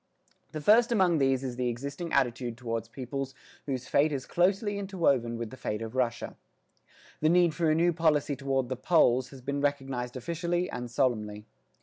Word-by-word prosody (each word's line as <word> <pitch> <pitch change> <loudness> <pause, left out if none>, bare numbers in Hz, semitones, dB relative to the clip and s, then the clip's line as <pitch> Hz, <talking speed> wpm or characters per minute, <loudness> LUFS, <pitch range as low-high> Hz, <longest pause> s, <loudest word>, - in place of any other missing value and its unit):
The 155 - -5
first 230 - +5
among 185 -7 +3
these 135 -1 +2
is 125 -2 -4
the 125 -1 0
existing 140 +7 -5
attitude 120 -3 0
toward 115 -2 -4
peoples 135 +1 -5 0.3
whose 130 -2 -3
fate 150 +2 +3
is 135 -3 -3
closely 200 +3 +1
interwoven 140 -12 0
with 115 -2 -5
the 130 - -10
fate 110 -3 -3
of 110 0 -6
Russia. 125 -2 -1 0.8
The 155 - +3
need 175 -1 +4
for 165 -1 +1
a 155 - +3
new 170 +2 +3
policy 155 -3 +2
toward 135 -2 -1
the 130 - -1
Poles 130 -3 +3
has 135 -1 -12
been 140 +2 -2
recognised 135 -4 -2
officially 170 +5 -1
and 125 0 -5
solemnly. 110 -5 -1
135 Hz, 180 wpm, -29 LUFS, 125-165 Hz, 0.8 s, first